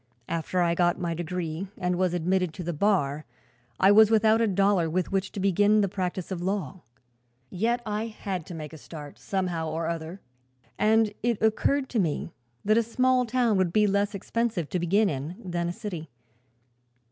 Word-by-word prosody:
After 170 +2 -1
I 170 -1 +2
got 175 0 +2
my 170 -1 -1
degree 170 +1 -4
and 180 0 0
was 180 -1 +1
admitted 180 0 0
to 180 - -6
the 175 +1 -3
bar 155 -5 +1 0.6
I 195 - +6
was 215 +1 +7
without 220 0 +4
a 230 - +3
dollar 195 -3 +2
with 180 +3 -1
which 195 0 -1
to - - -5
begin 205 +2 +3
the 200 - +2
practice 185 -1 -4
of 180 -2 -3
law. 190 -2 -3 0.7
Yet 235 +6 0
I 215 +1 -2
had 195 -5 -5
to 175 - -7
make 155 -1 -7
a 160 - -10
start, 150 -2 -10
somehow 180 -5 -2
or 160 +1 -2
other, 165 +2 -4 0.6
and 220 0 +3
it 235 -2 0
occurred 265 +5 +1
to 235 - 0
me 165 -2 -1 0.3
that 215 +2 +4
a - - +4
small 255 +2 +2
town 235 -3 +2
would 185 -2 +1
be 210 +3 +3
leas 200 0 +1
expensive 210 -4 -2
to 180 - -1
begin 195 +5 +2
in 145 +2 -4
than 175 -1 -2
a - - -1
city. 175 -6 -6
185 Hz, 185 wpm, -27 LUFS, 170-215 Hz, 0.7 s, was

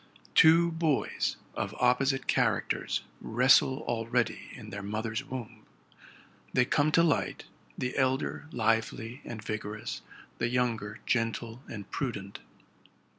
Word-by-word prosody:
'Two 165 - +7
boys 160 -4 0 0.2
of - - -3
opposite 130 +2 +3
characters - - +1 0.2
wrestle 130 +3 +4
already 120 0 -1
in - - -10
their 100 +1 -5
mother's 110 +3 -3
womb. 125 -4 -7 0.9
They 125 - +4
come 145 +3 +2
to 170 - +6
light, 160 -4 +1 0.3
the 125 0 -2
elder 130 +2 0
lively 115 +2 0
and 110 -2 -7
vigorous, 105 0 -4 0.4
the - - +1
younger 115 -3 -1
gentle 115 0 -1
and 100 -4 -7
prudent. 100 -8 -4
120 Hz, 115 wpm, -30 LUFS, 110-135 Hz, 0.9 s, Two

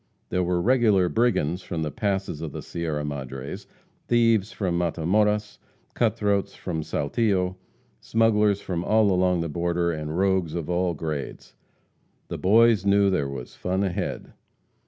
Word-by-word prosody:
There 90 - 0
were 90 0 0
regular 105 -4 +3
brigands 95 -8 +1
from 85 -3 -4
the 75 - -3
passes 95 -1 -2
of 80 -3 -5
the - - -6
Sierra 80 -3 -3
Madres; 70 +6 -6 0.4
thieves 115 -3 +3
from 90 -4 -2
Matamoras, 105 +5 0 0.3
cut 115 -3 +1
throats 100 -3 0
from 80 -4 -4
Saltillo; 90 +5 0 0.4
smugglers 105 -3 +2
from 85 -2 -3
all 110 +1 +3
along 90 -1 +2
the 85 - -2
border, 85 +2 0
and 75 0 -4
rogues 95 -4 +1
of 85 0 -3
all 90 -1 0
grades. 75 -3 -5 0.8
The - - -5
boys 110 +1 +4
knew 100 0 +4
there 75 -7 0
was 65 -3 -7
"fun 95 +2 -1
ahead." 95 -3 -3
90 Hz, 145 wpm, -25 LUFS, 85-105 Hz, 0.8 s, boys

